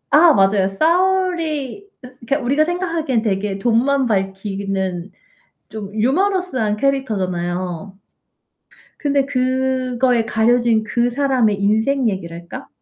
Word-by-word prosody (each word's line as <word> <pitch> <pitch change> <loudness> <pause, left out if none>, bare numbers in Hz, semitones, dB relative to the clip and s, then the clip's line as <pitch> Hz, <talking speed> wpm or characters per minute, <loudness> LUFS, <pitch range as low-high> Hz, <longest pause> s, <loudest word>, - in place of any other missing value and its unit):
아 330 +2 +7
맞아요. 195 -2 +3
사울이 340 - 0 0.2
으 - - -8 0.2
그러니까 280 +4 +1
우리가 280 +5 +2
생각하기에는 330 -8 -1
되게 200 -2 -1
돈만 250 +5 +2
밝히는 195 -3 -2 0.6
좀 205 -2 -8
유머러스한 265 - 0
캐릭터잖아요. 185 -8 -2 1.0
근데 280 -2 +1
그거에 255 -2 0
가려진 230 0 +2
그 240 +2 0
사람의 245 -6 +1
인생 225 +6 +1
얘기랄까? 170 -3 -6
240 Hz, 270 characters per minute, -19 LUFS, 200-280 Hz, 1.0 s, 아